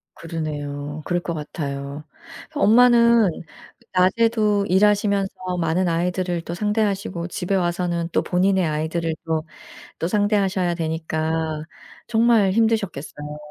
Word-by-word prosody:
그러네요. 150 -2 -5
그럴 175 0 0
것 170 - -4
같아요. 140 -2 -5 0.5
엄마는 235 -3 +5 0.6
낮에도 210 +2 +2
일하시면서 200 0 +2 0.3
많은 175 +2 +1
아이들을 175 +1 -1
또 170 - -6
상대하시고 200 -3 -1
집에 180 +2 -2
와서는 175 -2 -1
또 - - +2
본인의 185 +1 +2
아이들을 160 +2 -1
또 160 -1 -1 0.6
또 165 - -1
상대하셔야 200 -3 +1
되니까 160 -1 -2 0.4
정말 225 -4 +3
힘드셨겠어요. 185 -9 -1
180 Hz, 285 characters per minute, -22 LUFS, 160-205 Hz, 0.6 s, 엄마는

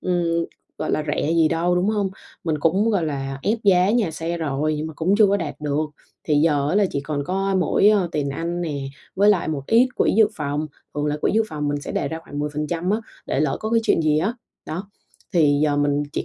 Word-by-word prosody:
ừm, 170 -2 0 0.3
gọi - - -2
là, 155 - 0
rẻ 145 +1 0
gì 165 -1 +4
đâu, 170 +2 +1
đúng 180 +3 +1
hông? 205 -3 0 0.3
Mình 160 -3 0
cũng, 190 +9 +2
gọi 195 -6 +1
là, 135 -3 -3
ép 220 +3 +1
giá 185 -1 +5
nhà 220 -6 +2
xe 165 +2 -3
rồi 155 0 -1
nhưng 150 +1 -3
mà 160 - -6
cũng 170 +6 +1
chưa 215 - +7
có 200 +1 +2
đạt 160 -7 -4
được. 150 +1 -1 0.4
Thì 150 - +1
giờ 145 -2 +2
á, 180 - 0
là 205 - +4
chỉ 140 - -2
còn 145 0 -3
có 195 +2 -1
mỗi, 195 +2 +3
ơ, 200 -4 +3
tiền 145 -2 -1
ăn 170 +4 -3
nè, 145 -5 -3 0.3
với 200 +2 +4
lại 185 -6 +1
một 145 -3 -2
ít 240 +3 +5
quỹ - - +3
dự 220 - +7
phòng. 150 0 -2 0.3
Thường 150 0 -1
là 150 - 0
quỹ - - +2
dự 225 - +4
phòng 150 -2 -3
mình 145 0 -1
sẽ - - -6
đề - - -1
ra 160 - -4
khoảng 145 - -7
10% 150 +4 -2
á, 215 +2 +1 0.3
để 135 - 0
lỡ 150 -3 +1
có 220 - -3
cái 230 0 +3
chuyện 165 - +2
gì 155 -1 +3
á. 200 +9 0 0.3
Đó, 185 +6 -5 0.4
thì 145 -4 +3
giờ 145 -1 +1
mình 145 0 +1
chỉ - - -2
160 Hz, 250 wpm, -22 LUFS, 150-190 Hz, 0.4 s, chưa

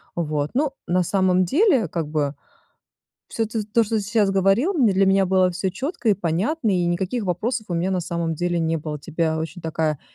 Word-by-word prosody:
Вот, 150 -3 -2
ну, 280 +2 +1 0.2
на 180 +1 +2
самом 185 0 +2
деле 280 - +3
как 165 -1 -3
бы, 150 -2 -1 0.9
всё 225 - -1
т 220 0 -3
то 230 - +5
что 220 +1 -2
ты 210 - 0
сейчас 205 -1 +1
говорил, 195 - +2
м, 260 -8 +4
для 195 0 +3
меня 195 0 +3
было 185 -1 +3
всё 190 +2 -2
четко 260 - -2
и - - +6
понятно, 205 - -1
и 180 -2 +1
никаких 185 +7 -1
вопросов 215 +6 -2
у 175 - -2
меня 175 +3 0
на 185 -2 0
самом 170 -1 -2
деле 175 +1 -1
не 165 0 0
было. 155 -1 -5
У - - -8
тебя 160 +1 -1
очень 160 +3 -6
такая 160 -2 -1
185 Hz, 215 wpm, -22 LUFS, 165-220 Hz, 0.9 s, и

